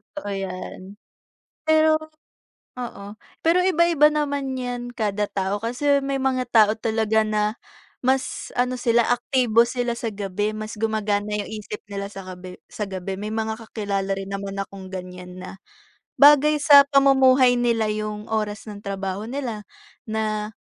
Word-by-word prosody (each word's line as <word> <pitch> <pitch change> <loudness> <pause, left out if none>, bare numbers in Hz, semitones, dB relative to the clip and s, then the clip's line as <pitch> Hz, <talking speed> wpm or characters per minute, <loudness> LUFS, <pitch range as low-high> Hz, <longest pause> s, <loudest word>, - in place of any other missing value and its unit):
Totoo 290 -9 -5
yan. 190 0 -6 0.7
Pero 315 0 +4 0.8
oo. 210 -5 -7 0.3
Pero 350 +2 +4
iba-iba 340 -4 +4
naman 285 -3 -2
yan 245 -1 -4
kada 210 -3 -2
tao 195 +1 -2
kasi 280 +5 +1
may 275 0 -1
mga 260 -2 -1
tao 215 -2 +5
talaga 220 -1 +1
na 215 0 0 0.5
mas 260 +1 -1
ano 250 +1 +1
sila, 235 -1 +2
aktibo 245 -1 +3
sila 240 0 -2
sa 235 -1 -3
gabi, 205 +1 -2
mas 215 +1 -6
gumagana 210 -1 -1
yung - - -6
isip 210 +1 -7
nila 200 0 -5
sa 195 -2 -9
gabi 180 0 -9
sa 210 -2 -6
gabi. 190 0 -4
May 205 +2 -5
mga 220 0 -2
kakilala 200 -3 -2
rin 195 0 -6
naman 200 0 -5
akong 195 -1 -7
ganyan 180 -1 -8
na 185 +1 -10 0.5
bagay 295 +1 +6
sa 285 -2 +8
pamumuhay 265 -2 +5
nila 230 -3 +1
yung 210 0 -4
oras 210 -2 -2
ng 205 - -8
trabaho 195 +1 -3
nila 240 -5 -5 0.4
na 215 -1 -2
220 Hz, 145 wpm, -23 LUFS, 200-255 Hz, 0.8 s, sa